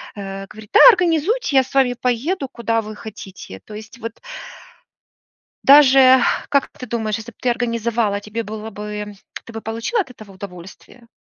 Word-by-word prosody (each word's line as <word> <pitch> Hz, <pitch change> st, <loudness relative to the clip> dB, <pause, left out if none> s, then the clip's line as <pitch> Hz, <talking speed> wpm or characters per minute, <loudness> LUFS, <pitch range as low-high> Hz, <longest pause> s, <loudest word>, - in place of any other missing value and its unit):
говорит: 195 Hz, +1 st, -8 dB
"Да, -, -, +6 dB
организуйте, 360 Hz, -, +2 dB
я 265 Hz, -, +6 dB
с 260 Hz, -, -15 dB
вами 255 Hz, -2 st, +3 dB
поеду, 265 Hz, +6 st, -1 dB
куда 230 Hz, -1 st, -1 dB
вы 215 Hz, 0 st, -9 dB
хотите". 195 Hz, -, -10 dB
То 210 Hz, -, -12 dB
есть 220 Hz, +3 st, -10 dB
вот 230 Hz, 0 st, -8 dB, 1.4 s
Даже, 265 Hz, -2 st, +7 dB, 0.3 s
как 280 Hz, -1 st, +1 dB
ты 250 Hz, -, -10 dB
думаешь, 220 Hz, -2 st, -2 dB
если 225 Hz, +1 st, -9 dB
б -, -, -33 dB
ты 250 Hz, -, +1 dB
организовала, 230 Hz, -3 st, -1 dB
тебе 220 Hz, +2 st, -5 dB
было 215 Hz, +1 st, -7 dB
бы 210 Hz, 0 st, -7 dB, 0.3 s
ты 230 Hz, -, -12 dB
бы 225 Hz, -, -6 dB
получила 230 Hz, -, -2 dB
от 325 Hz, -, -8 dB
этого 215 Hz, -4 st, -14 dB
удовольствие? 190 Hz, +5 st, -12 dB
230 Hz, 160 wpm, -20 LUFS, 210-260 Hz, 1.4 s, Даже